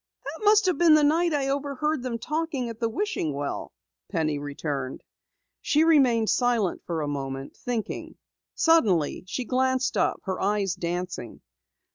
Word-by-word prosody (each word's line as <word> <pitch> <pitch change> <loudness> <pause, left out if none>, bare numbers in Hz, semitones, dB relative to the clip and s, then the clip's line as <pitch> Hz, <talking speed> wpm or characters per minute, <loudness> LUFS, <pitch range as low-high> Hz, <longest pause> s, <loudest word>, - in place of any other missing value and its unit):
"That - - -7
must 420 0 +6
have 365 -6 +1
been 335 -3 +7
the 305 - +4
night 330 +4 +3
I 285 -3 0
overheard 285 +1 -1
them 245 -2 -3
talking 300 -2 -2
at 230 -1 -8
the 230 - 0
wishing 225 - -2
well," 145 0 -4 0.4
Penny 155 -3 -1
returned. 145 -2 -4 0.6
She 305 +2 +3
remained 255 -9 +4
silent 240 -7 +1
a - - -1
moment, 135 -1 -5
thinking. 240 -4 -4 0.4
Suddenly, 205 - +3
she 250 +6 -3
glanced 260 +1 +1
up, - - +1
her 190 -2 -3
eyes 200 -2 +1
dancing. 175 - -4
240 Hz, 145 wpm, -26 LUFS, -, 0.6 s, been